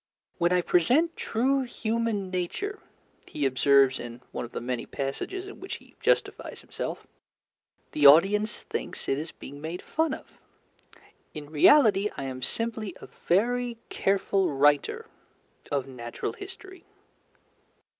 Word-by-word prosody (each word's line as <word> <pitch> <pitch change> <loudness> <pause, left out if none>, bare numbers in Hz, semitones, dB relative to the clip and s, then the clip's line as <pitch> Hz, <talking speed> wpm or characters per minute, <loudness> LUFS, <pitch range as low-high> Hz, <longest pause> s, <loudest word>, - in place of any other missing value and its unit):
"When 170 0 +3
I 180 0 +4
present 260 - +3
true 265 +5 +1
human 225 -5 -2
nature," 285 - -3 0.5
he 145 - -2
observes 135 0 +4
in 120 0 -8
one - - -4
of 120 - -12
the - - -4
many 125 0 -3
passages 140 - -4
in 395 - -10
which 380 - -5
he - - -15
justifies - - 0
himself, - - -5 0.9
"the 145 -1 +6
audience 200 +8 +5
thinks - - -5
it 135 - +1
is 160 +2 -6
being 145 +1 -11
made 165 +3 -5
fun 320 0 0
of. - - -16 1.0
In 150 -1 -8
reality 210 - +5
I - - -4
am 130 -1 -5
simply 220 - -2
a - - -10
very 240 +6 0
careful 195 -1 +1
writer 145 +1 +2 0.7
of 140 -3 0
natural 120 -3 -5
history." 380 -2 -11
185 Hz, 135 wpm, -27 LUFS, -, 1.0 s, the